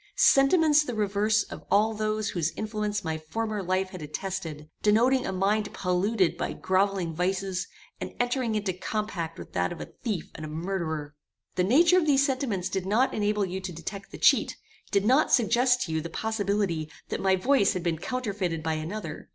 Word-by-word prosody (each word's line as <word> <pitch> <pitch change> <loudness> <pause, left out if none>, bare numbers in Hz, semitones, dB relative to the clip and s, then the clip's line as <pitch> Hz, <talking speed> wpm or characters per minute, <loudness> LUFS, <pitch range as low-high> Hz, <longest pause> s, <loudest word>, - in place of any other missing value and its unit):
Sentiments 300 +2 +5
the 250 -5 -4
reverse 210 +1 +2
of - - -10
all 215 +2 +3
those 215 0 -1
whose 170 -2 -1
influence 210 -1 -2
my 160 -1 -2
former 215 +6 -3
life 185 +1 -1
had 185 - -8
attested, 155 -1 -5
denoting 245 +5 +3
a - - -1
mind 205 +3 0
polluted 185 +1 +1
by - - -2
grovelling 190 -3 0
vices, 185 +2 -1 0.3
and - - -6
entering 245 -2 0
into 205 -3 -1
compact 185 -4 -3
with - - -10
that - - 0
of 175 - -7
a - - -5 0.2
thief 210 -9 -3
and 155 - -8
a 155 - -5
murderer. 160 -3 -3 0.4
The 180 - +1
nature 335 - +5
of 320 - -1
these 275 -1 +4
sentiments 255 -10 -1
did 190 -1 -3
not 230 +7 +2
enable 210 -1 +1
you 190 +1 -4
to 185 -1 -5
detect 195 +5 -7
the - - -9
cheat, - - +3 0.3
did 200 -1 +1
not 265 +7 +4
suggest 250 +2 +3
to 165 - -5
you 160 0 0
the 170 - -6
possibility 200 -6 -1 0.2
that - - -3
my 190 -1 +3
voice 225 +2 +3
had 180 - -3
been 165 -3 -1
counterfeited 195 -9 -2
by 160 0 0
another. 160 +1 -5
200 Hz, 185 wpm, -27 LUFS, 180-220 Hz, 0.4 s, Sentiments